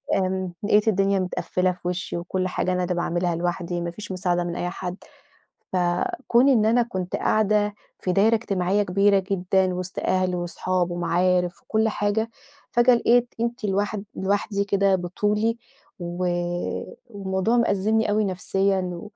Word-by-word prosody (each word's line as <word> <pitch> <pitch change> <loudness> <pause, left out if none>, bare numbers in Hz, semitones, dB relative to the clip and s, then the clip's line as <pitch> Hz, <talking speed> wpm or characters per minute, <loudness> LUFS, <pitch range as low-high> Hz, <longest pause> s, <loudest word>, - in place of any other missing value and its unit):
آمم 185 -1 -1
لقيت 210 +1 +3
الدنيا 195 -1 +2
متقفِّلة 185 0 0
في 175 -1 -7
وشي 180 0 -3
وكُلّ 185 +2 -2
حاجة 185 - -1
أنا 180 0 0
اللي 180 0 -1
باعملها 175 0 0
لوحدي، 175 0 -2
ما 170 0 -3
فيش 205 +3 -8
مساعدة 175 -1 0
من 175 0 -4
أي 175 - -2
حد، 180 0 -5 0.8
ف - - +2 0.5
كون 245 +4 +5
إن 230 -6 +4
أنا 230 +3 +4
كنت 185 -6 -4
قاعدة 210 -1 +2 0.3
في 185 - -1
دايرة 215 +5 +4
إجتماعية 200 -2 0
كبيرة 200 +1 +3
جدًا 185 0 +1
وسط 185 +1 -5
أهل 185 -1 +1
وأصحاب 175 0 -1
ومعارف 180 +1 +1
وكُلّ 220 0 +1
حاجة، 210 +2 0 0.4
فجأة 240 +1 +5
لقيت 240 +1 +2
أنتِ 235 0 -2
لوحد 200 +1 -1
لوحدي 200 +1 0
كده 200 -1 +3
بطُولي 210 +5 0 0.4
و 175 +1 -3 0.8
والموضوع 195 +2 0
مأزِّمني 220 0 +2
أوي 215 0 +2
نفسيًا، 190 -1 -1
190 Hz, 145 wpm, -24 LUFS, 180-210 Hz, 0.8 s, كون